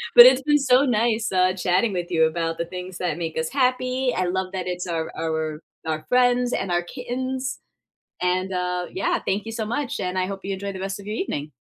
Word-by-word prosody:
But 240 - +13
it's 255 +1 +7
been 295 0 +4
so 260 +1 +4
nice, 230 -2 +1
uh, 185 0 +3
chatting 190 +3 +1
with 175 0 -3
you 160 -1 +4
about 165 0 -1
the 170 - -2
things 180 +1 -7
that 180 -1 -1
make 165 -2 -4
us 160 0 -1
happy. 255 -1 +1
I 185 - +1
love 185 +1 -1
that 185 -1 -3
it's 180 0 -3
our 165 -1 -2
our 160 -1 -2 0.3
our 155 -1 -2
friends 250 0 +3
and 185 - -1
our 175 0 +1
kittens. 255 +4 -4 0.6
And, 185 +1 0
uh, 180 0 -1
yeah, 190 - 0
thank 205 +3 -1
you 225 - -5
so 220 -1 -2
much, 270 +3 -2
and 185 0 -2
I 185 - +1
hope 195 0 -5
you 195 - -2
enjoy 200 +1 -4
the 190 - -7
rest 195 +1 -4
of 200 - -12
your 215 - -3
evening. 150 - -3
190 Hz, 225 wpm, -24 LUFS, 175-245 Hz, 0.6 s, But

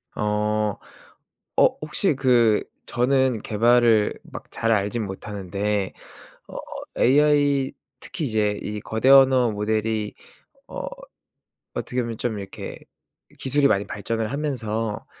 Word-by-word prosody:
어. 105 0 0 0.8
어 - - +6 0.2
혹시 155 +2 +1
그 120 -5 +3 0.2
저는 130 -2 +1
개발을 115 0 +3
막 - - -11
잘 115 - -1
알지는 105 +1 0
못하는데 100 0 -3 0.5
어 - - -9 0.4
AI 145 0 +3 0.3
특히 160 - -4
이제 105 -3 +1
이 105 0 -4
거대 110 +6 -1
언어 130 -3 +6
모델이 110 0 -1 0.5
어 - - -6 0.9
어떻게 125 0 -2
보면 115 -2 -4
좀 110 -4 -2
이렇게 95 -1 -8 0.6
기술이 140 +1 +2
많이 100 -5 +1
발전을 110 +2 -3
하면서 115 -7 -3
115 Hz, 215 characters per minute, -23 LUFS, 105-130 Hz, 0.9 s, 어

